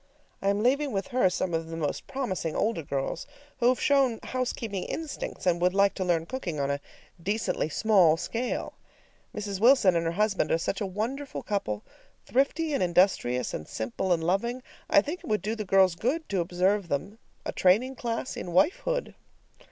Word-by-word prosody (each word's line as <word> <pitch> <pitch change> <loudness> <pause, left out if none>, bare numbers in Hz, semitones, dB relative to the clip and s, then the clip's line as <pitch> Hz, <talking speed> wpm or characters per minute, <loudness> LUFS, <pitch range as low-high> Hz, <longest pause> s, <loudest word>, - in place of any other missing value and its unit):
I 195 - +1
am 200 +1 +1
leaving 280 +3 +2
with 195 -3 -2
her 245 -7 +3
some 180 -1 -2
of 165 0 -1
the 165 0 -6
most 150 -3 -3
promising 190 - -3
older 215 -5 0
girls 140 +2 -3 0.3
who 240 - +3
have 255 - +1
shown 270 -5 +3
housekeeping 235 -6 -3
instincts, 320 -10 -5
and 175 -1 +2
would 180 +1 +2
like 200 0 +4
to 190 - -3
learn 170 -3 +1
cooking 180 - -4
on 140 0 0
a 140 - -1 0.4
decently 205 -3 -1
small 180 -3 +4
scale. 230 +8 -3 0.6
Mrs. 205 -2 -4
Wilson 230 -5 +5
and 165 0 +1
her 165 - -1
husband 210 +1 +1
are - - +4
such 190 +4 -2
a 200 - 0
wonderful 240 +9 -4
couple, 105 - -2 0.4
thrifty 295 +4 +1
and 275 - 0
industrious 175 -9 +2
and 75 - -5
simple 115 +12 -3
and 165 -2 +2
loving, 235 +9 0 0.3
I - - +6
think 325 +8 -4
it - - -12
would 215 -4 0
do 215 +2 -1
the 215 -2 -4
girls 190 -1 +5
good 265 - -1
to 195 - 0
observe 185 +3 +1
them. 190 +9 -3 0.3
A - - -2
training 215 +9 +3
class 235 +1 -3
in - - -6
wifehood! - - +1
200 Hz, 185 wpm, -28 LUFS, 175-245 Hz, 0.6 s, I